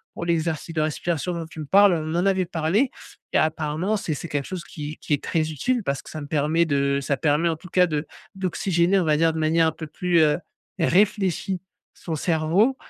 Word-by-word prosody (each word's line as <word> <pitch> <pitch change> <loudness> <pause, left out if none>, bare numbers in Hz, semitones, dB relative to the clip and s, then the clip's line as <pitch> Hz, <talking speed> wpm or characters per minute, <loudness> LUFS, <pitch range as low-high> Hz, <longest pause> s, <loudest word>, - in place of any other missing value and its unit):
pour 170 - -4
l'exercice 165 -1 -1
de 155 - +1
respiration 165 +2 -1
dont 165 -1 -4
tu 160 -1 -11
me - - -5
parles, 200 +5 +6
on 155 0 -3
en 175 +2 +1
avait 190 -2 +2
parlé 170 - +1 0.4
et - - +4
apparemment 155 +6 0
c'est 165 - -3
c'est 170 - -6
quelque 145 -2 -2
chose 185 -2 -5
qui 150 -1 -7
qui - - -3
est 145 - 0
très 160 -1 0
utile 240 - -1
parce 140 -3 -2
que - - -12
ça 155 - -6
me 145 - -7
permet 155 +3 +2
de 140 -2 +1
ça 140 +1 0
permet, 150 +4 +2
en 165 - 0
tout 180 +1 -13
cas 180 +1 +4
de 150 -1 -2 0.3
d'oxygéner 185 0 +1
on - - +1
va 155 -1 +3
dire, 165 0 +3
de 160 - -3
manière 160 +1 +3
un 160 - +1
peu 160 - -7
plus, 175 +2 +1
heu, 150 +1 +3 0.4
réfléchie 190 +1 +1 0.3
son 165 - -5
cerveau 170 - +2
165 Hz, 225 wpm, -24 LUFS, 155-180 Hz, 0.4 s, parles